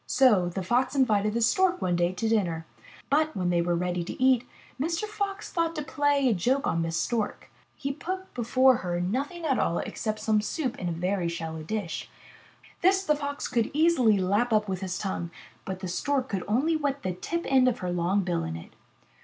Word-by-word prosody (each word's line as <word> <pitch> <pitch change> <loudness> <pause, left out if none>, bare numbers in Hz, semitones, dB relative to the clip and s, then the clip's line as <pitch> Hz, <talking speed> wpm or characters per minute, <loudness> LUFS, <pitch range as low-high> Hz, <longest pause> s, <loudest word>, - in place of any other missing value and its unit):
So 215 -9 +4
the 185 +2 -4
Fox 250 +7 +1
invited 215 -5 +2
the 235 - +1
Stork 370 - +3
one 175 -1 0
day 175 0 +2
to 205 +5 -2
dinner. 175 -8 0 0.5
But, 310 +2 +2
when 180 -1 0
they 170 -1 +2
were 175 0 +1
ready 180 0 -1
to - - -7
eat, 255 -2 +3 0.3
Mr. 330 +5 -1
Fox 420 -1 -4
thought 330 -2 0
to 300 - -3
play 285 0 +1
a 240 - +4
joke 250 +9 +1
on 165 - +1
Miss 165 0 -1
Stork. 225 -4 -2 0.2
He 275 -1 -3
put 370 +7 -5
before 255 +1 +4
her 175 -1 -2
nothing 275 - -2
at 270 -4 +1
all 170 - +1
except 215 -1 -3
some 215 -1 +2
soup 255 +3 -2
in 180 - -2
a - - -2
very 180 +1 -1
shallow 160 -1 -5
dish. 190 +2 -4 0.7
This 380 +2 +4
the 300 -4 +2
Fox 285 -1 -4
could 230 -2 0
easily 300 -10 +4
lap 205 +6 +1
up 215 -1 +2
with 190 -1 -3
his 185 -1 -3
tongue, 190 -4 -3 0.4
but 190 -1 -5
the 185 - -4
Stork 265 +8 -1
could 195 -3 -2
only 270 +10 +2
wet 285 -2 -1
the 185 - -1
tip 335 - -3
end 260 -1 +4
of 250 - +1
her 180 - -1
long 175 +3 +1
bill 175 -2 -1
in 80 0 -4
it. 80 - -10
225 Hz, 210 wpm, -27 LUFS, 180-285 Hz, 0.7 s, So